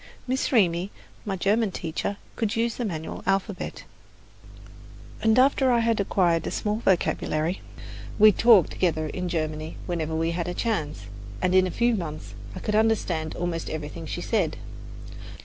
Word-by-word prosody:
Miss 260 Hz, +2 st, -1 dB
Reamy, 185 Hz, -6 st, +3 dB, 0.4 s
my 195 Hz, -2 st, -2 dB
German 205 Hz, +4 st, +2 dB
teacher, 180 Hz, +3 st, -3 dB, 0.2 s
could 220 Hz, -3 st, -1 dB
use 230 Hz, 0 st, +1 dB
the 245 Hz, -, -2 dB
manual 160 Hz, -6 st, -5 dB
alphabet, 195 Hz, 0 st, -1 dB, 1.4 s
and 220 Hz, +1 st, +3 dB
after 265 Hz, 0 st, +4 dB
I 235 Hz, -1 st, +3 dB
had 230 Hz, -1 st, +1 dB
acquired 175 Hz, -4 st, +2 dB
a -, -, 0 dB
small 210 Hz, 0 st, -1 dB
vocabulary, 175 Hz, -4 st, 0 dB, 0.6 s
we 215 Hz, 0 st, +8 dB
talked 210 Hz, -3 st, +5 dB
together 160 Hz, -4 st, 0 dB
in 180 Hz, +2 st, -3 dB
German 155 Hz, -1 st, -3 dB
whenever 160 Hz, -3 st, -2 dB
we 165 Hz, +1 st, 0 dB
had 170 Hz, 0 st, -2 dB
a 175 Hz, -, -3 dB
chance, 160 Hz, -, -2 dB, 0.4 s
and 185 Hz, 0 st, +1 dB
in 185 Hz, 0 st, +5 dB
a -, -, -3 dB
few 235 Hz, +6 st, +2 dB
months 155 Hz, -, -5 dB, 0.2 s
I -, -, -5 dB
could 210 Hz, -, -2 dB
understand 200 Hz, -8 st, +1 dB
almost 175 Hz, -2 st, -3 dB
everything 155 Hz, +1 st, -6 dB
she -, -, -4 dB
said. -, -, 0 dB
185 Hz, 155 wpm, -26 LUFS, 165-220 Hz, 1.4 s, we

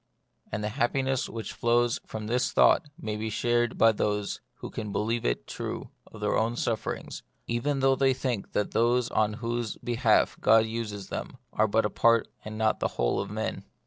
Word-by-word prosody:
And 105 Hz, -, -3 dB
the 105 Hz, -, -1 dB
happiness 130 Hz, +4 st, 0 dB
which 115 Hz, -1 st, -6 dB
flows 120 Hz, 0 st, +2 dB
from 110 Hz, -1 st, -5 dB
this 125 Hz, +5 st, 0 dB
thought 160 Hz, -, +5 dB
may 110 Hz, -1 st, -3 dB
be 110 Hz, +1 st, -3 dB
shared 120 Hz, +2 st, +1 dB
by 115 Hz, -, +6 dB
those 105 Hz, -1 st, -1 dB
who -, -, -8 dB
can 105 Hz, -2 st, -5 dB
believe 115 Hz, +3 st, -1 dB
it -, -, 0 dB
true -, -, -5 dB, 0.2 s
of 110 Hz, -, -12 dB
their 105 Hz, -, +1 dB
own 115 Hz, +2 st, +1 dB
sufferings, 115 Hz, -2 st, -3 dB, 0.2 s
even 135 Hz, +4 st, -1 dB
though 135 Hz, 0 st, +4 dB
they 135 Hz, 0 st, +3 dB
think 125 Hz, -6 st, -3 dB
that 105 Hz, -, 0 dB
those 120 Hz, +1 st, +2 dB
on 110 Hz, -1 st, +2 dB
whose 120 Hz, 0 st, -3 dB
behalf 120 Hz, -2 st, +2 dB
God 110 Hz, +1 st, +6 dB
uses 110 Hz, -3 st, -5 dB
them -, -, -5 dB, 0.2 s
are 110 Hz, -, +3 dB
but 110 Hz, +2 st, +2 dB
a 105 Hz, -, -1 dB
part 115 Hz, -1 st, +4 dB, 0.2 s
and 110 Hz, 0 st, -6 dB
not 110 Hz, 0 st, +1 dB
the -, -, +1 dB
whole -, -, +1 dB
of -, -, -3 dB
men. -, -, -3 dB
115 Hz, 190 wpm, -28 LUFS, 105-120 Hz, 0.2 s, by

